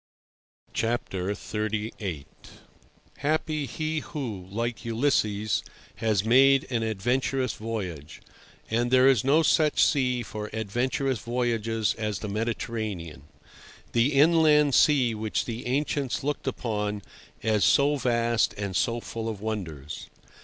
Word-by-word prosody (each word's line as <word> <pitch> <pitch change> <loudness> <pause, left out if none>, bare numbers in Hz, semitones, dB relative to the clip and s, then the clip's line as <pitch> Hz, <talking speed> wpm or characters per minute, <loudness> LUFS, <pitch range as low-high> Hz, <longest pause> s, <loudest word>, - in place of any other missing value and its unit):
XXXVIII. 105 -4 -3 0.9
Happy 155 0 -1
he 155 +2 -2
who, 115 - -6
like 115 +3 -3
Ulysses, 110 -4 +1 0.3
has 110 -3 +1
made 135 +3 +5
an 115 -2 0
adventurous 125 +5 0
voyage; 90 -9 -5 0.5
and 120 +2 +1
there 130 +1 +5
is 130 -6 +4
no 150 +5 +4
such 155 -1 +4
sea 125 -4 +1
for 105 -1 -6
adventurous 120 +4 -1
voyages 115 -2 0
as 105 -2 -2
the 105 - -5
Mediterranean—the 110 - -4
inland 150 -1 +5
sea 130 -6 +4
which 110 0 -2
the 120 0 -5
ancients 140 0 -1
looked 145 0 -3
upon 105 -5 -2 0.4
as 110 -2 +2
so 145 +1 +4
vast 120 -3 +1
and 100 -2 -4
so 115 +3 +1
full 115 0 -5
of 110 -3 -5
wonders. 85 -10 -5
115 Hz, 110 wpm, -27 LUFS, 105-135 Hz, 0.9 s, made